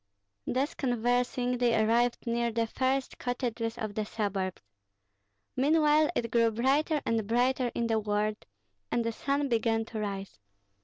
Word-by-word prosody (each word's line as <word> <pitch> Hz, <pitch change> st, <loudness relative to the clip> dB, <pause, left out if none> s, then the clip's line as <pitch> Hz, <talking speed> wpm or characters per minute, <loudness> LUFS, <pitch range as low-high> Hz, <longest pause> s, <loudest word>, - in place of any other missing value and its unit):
Thus 275 Hz, +5 st, 0 dB
conversing 245 Hz, 0 st, 0 dB
they 240 Hz, -2 st, +3 dB
arrived 235 Hz, +2 st, +2 dB
near 235 Hz, 0 st, 0 dB
the 230 Hz, 0 st, 0 dB
first 260 Hz, +3 st, -1 dB
cottages 240 Hz, -2 st, -2 dB
of 215 Hz, -2 st, -4 dB
the 215 Hz, -, -1 dB
suburbs. 200 Hz, -, -3 dB, 0.9 s
Meanwhile 300 Hz, +2 st, +4 dB
it 230 Hz, -1 st, -1 dB
grew 230 Hz, -1 st, +4 dB
brighter 275 Hz, +7 st, +1 dB
and 225 Hz, -3 st, 0 dB
brighter 245 Hz, +2 st, +1 dB
in 235 Hz, -, 0 dB
the 225 Hz, -1 st, +1 dB
world, 210 Hz, 0 st, -1 dB, 0.4 s
and 235 Hz, -, +1 dB
the 230 Hz, -, 0 dB
sun 280 Hz, +4 st, -1 dB
began 225 Hz, -2 st, +1 dB
to 225 Hz, -1 st, -6 dB
rise. 195 Hz, -, -5 dB
235 Hz, 145 wpm, -29 LUFS, 220-255 Hz, 0.9 s, Meanwhile